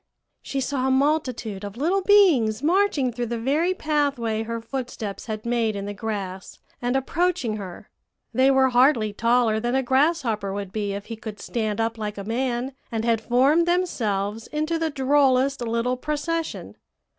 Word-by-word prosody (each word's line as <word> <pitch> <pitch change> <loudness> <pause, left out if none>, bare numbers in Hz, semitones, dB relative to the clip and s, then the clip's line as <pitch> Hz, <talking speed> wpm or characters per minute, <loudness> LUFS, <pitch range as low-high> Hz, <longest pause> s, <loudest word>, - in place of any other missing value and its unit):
she 275 - -3
saw 265 0 -1
a - - +2
multitude 260 -7 0
of 205 +2 -7
little 350 +8 +1
beings 315 - +4
marching 330 -6 +2
through 240 0 -3
the 235 +1 -3
very 290 +10 +1
pathway 285 - 0
her 230 +1 -4
footsteps 230 -4 -5
had 215 0 -5
made 235 -2 0
in 200 0 -4
the 205 - -4
grass, 195 -3 -5 0.2
and 245 +1 0
approaching 270 -4 0
her. 190 -4 -8 0.5
They 260 +1 +4
were 265 -1 +4
hardly 245 -4 +3
taller 230 0 +2
than 240 +3 -1
a 265 - +2
grasshopper 260 - +1
would 200 -1 -5
be 205 -1 -2
if 200 0 -6
he 230 - -6
could 220 -2 -8
stand 220 -2 -2
up 225 0 -1
like 210 -1 -4
a 200 - -5
man, 245 +3 -2 0.2
and 225 -1 -2
had 230 -2 +2
formed 270 +9 +3
themselves 220 - -1
into 310 +2 -1
the 325 -1 0
drollest 275 -1 +2
little 235 +2 -1
procession. 310 +4 -3
245 Hz, 170 wpm, -24 LUFS, 220-285 Hz, 0.5 s, beings